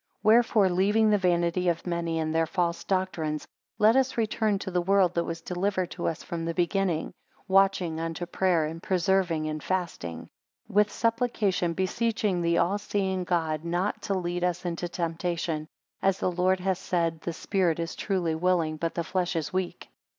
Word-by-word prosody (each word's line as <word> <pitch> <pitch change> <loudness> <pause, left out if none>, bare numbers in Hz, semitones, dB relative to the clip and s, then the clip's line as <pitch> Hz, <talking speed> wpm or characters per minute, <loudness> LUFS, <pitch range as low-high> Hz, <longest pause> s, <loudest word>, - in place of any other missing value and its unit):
3 215 - +4
Wherefore 225 -3 +5
leaving 205 +4 +3
the 210 - +4
vanity 175 0 +2
of 170 -1 -2
many, 170 -2 -1
and 160 0 -1
their 165 0 +2
false 170 0 -1
doctrines; 170 -5 -1 0.3
let 215 +3 +5
us 265 -1 +2
return 220 -2 +1
to 190 -1 -5
the 180 0 +1
word 190 -1 +3
that 170 -1 0
was 165 0 -5
delivered 185 +1 -1
to 175 - -3
us 165 - -3
from 170 -1 -4
the 165 0 -3
beginning: 175 -2 0 0.3
Watching 190 -4 +3
unto 165 +1 -3
prayer; 175 -2 +1
and 165 +2 -6
persevering 180 -3 +1
in 155 0 -3
fasting; 155 - -3 0.4
4 - - -14
With 210 0 +5
supplication 225 -7 0
beseeching 200 0 0
the 170 0 +2
all 200 +4 +2
seeing 190 -3 -1
God 160 -3 0
not 175 +4 -1
to 195 - -1
lead 175 -1 -2
us 180 0 -1
into 175 0 -3
temptation; 165 -2 -2 0.3
as 195 -1 +2
the 185 - 0
Lord 185 +1 +2
hath 190 0 0
said, 165 -3 -1
The 170 - -3
spirit 175 -2 0
is 165 0 -3
truly 180 -5 -1
willing, 165 -2 +1
but 165 +1 -2
the 170 - -1
flesh 180 +1 -1
is 160 0 -2
weak. 185 -1 -3
180 Hz, 180 wpm, -27 LUFS, 165-195 Hz, 0.4 s, Wherefore